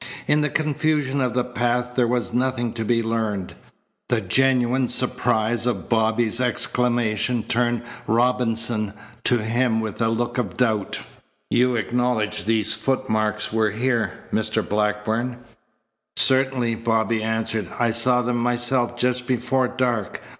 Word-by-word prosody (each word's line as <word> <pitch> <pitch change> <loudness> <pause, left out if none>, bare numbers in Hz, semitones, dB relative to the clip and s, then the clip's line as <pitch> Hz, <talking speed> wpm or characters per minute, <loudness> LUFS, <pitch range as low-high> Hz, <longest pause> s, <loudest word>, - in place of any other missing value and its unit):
In 150 +1 +3
the 150 - +1
confusion 150 -2 0
of 125 -2 0
the 125 - +2
path 125 0 -1
there 125 -1 +2
was 120 -1 -1
nothing 125 -2 0
to 115 - -3
be 115 +1 +1
learned. 110 -4 -2 0.6
The 120 -2 +2
genuine 125 +4 +2
surprise 120 -2 0
of 125 - -2
Bobby's 115 +1 +1
exclamation 120 -1 +1
turned 120 0 0 0.2
Robinson 115 -2 +1 0.3
to 120 -3 +2
him 115 +1 +1
with 110 -1 -4
a 115 - +3
look 120 +2 -1
of 100 -7 -3
doubt. 110 -5 0 0.5
"You 125 0 +3
acknowledge 115 -1 -1
these 110 -1 +1
footmarks 110 -5 -1
were 110 -1 +2
here, 115 -2 -1
Mr. 110 0 0
Blackburn?" 105 +4 -1 0.8
"Certainly," 130 -3 +2
Bobby 115 -1 0
answered. 110 -2 -1
"I 120 -1 +2
saw 125 +2 +3
them 120 0 0
myself 120 0 0
just 125 0 0
before 130 +1 +1
dark. 120 -5 -1
120 Hz, 130 wpm, -23 LUFS, 110-125 Hz, 0.8 s, In